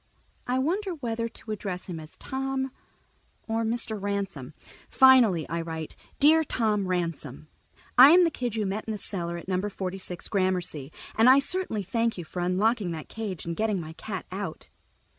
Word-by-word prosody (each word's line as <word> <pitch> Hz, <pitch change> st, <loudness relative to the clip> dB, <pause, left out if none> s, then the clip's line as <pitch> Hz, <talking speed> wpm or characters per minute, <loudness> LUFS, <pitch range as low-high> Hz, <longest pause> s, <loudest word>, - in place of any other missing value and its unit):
I 250 Hz, +1 st, +1 dB
wonder 360 Hz, +7 st, 0 dB
whether 230 Hz, -5 st, -3 dB
to 220 Hz, -1 st, -9 dB
address 195 Hz, -4 st, -4 dB
him 175 Hz, -3 st, -6 dB
as 155 Hz, 0 st, -12 dB
"Tom" 265 Hz, 0 st, -3 dB, 0.8 s
or 225 Hz, 0 st, 0 dB
"Mr. 225 Hz, -2 st, -2 dB
Ransom." 195 Hz, -9 st, -3 dB, 0.3 s
Finally 240 Hz, -, +6 dB
I 170 Hz, +1 st, -2 dB
write: 160 Hz, -1 st, -6 dB, 0.2 s
Dear 315 Hz, +3 st, +6 dB
Tom 215 Hz, -8 st, 0 dB
Ransom: 165 Hz, -5 st, -3 dB, 0.5 s
_I 265 Hz, +3 st, +12 dB
am 360 Hz, +2 st, +7 dB
the 335 Hz, -, +3 dB
kid 245 Hz, -6 st, -3 dB
you 215 Hz, -2 st, 0 dB
met 200 Hz, +3 st, -3 dB
in 220 Hz, -, -3 dB
the -, -, -3 dB
cellar 170 Hz, -4 st, -3 dB
at 170 Hz, -, -10 dB
Number 190 Hz, +2 st, -1 dB
Forty 190 Hz, -1 st, -4 dB
six 180 Hz, -2 st, -7 dB
Gramercy, 180 Hz, -7 st, -1 dB, 0.2 s
and 225 Hz, +3 st, +5 dB
I 260 Hz, -, +8 dB
certainly 280 Hz, -, -1 dB
thank 230 Hz, +4 st, 0 dB
you 175 Hz, -, -4 dB
for 180 Hz, -, -6 dB
unlocking 190 Hz, +3 st, +1 dB
that 160 Hz, -2 st, -7 dB
cage 210 Hz, -6 st, -5 dB
and 170 Hz, 0 st, -3 dB
getting 215 Hz, -1 st, 0 dB
my 160 Hz, -1 st, -7 dB
cat 190 Hz, +2 st, -6 dB
out. 190 Hz, -3 st, -6 dB
205 Hz, 180 wpm, -27 LUFS, 180-235 Hz, 0.8 s, I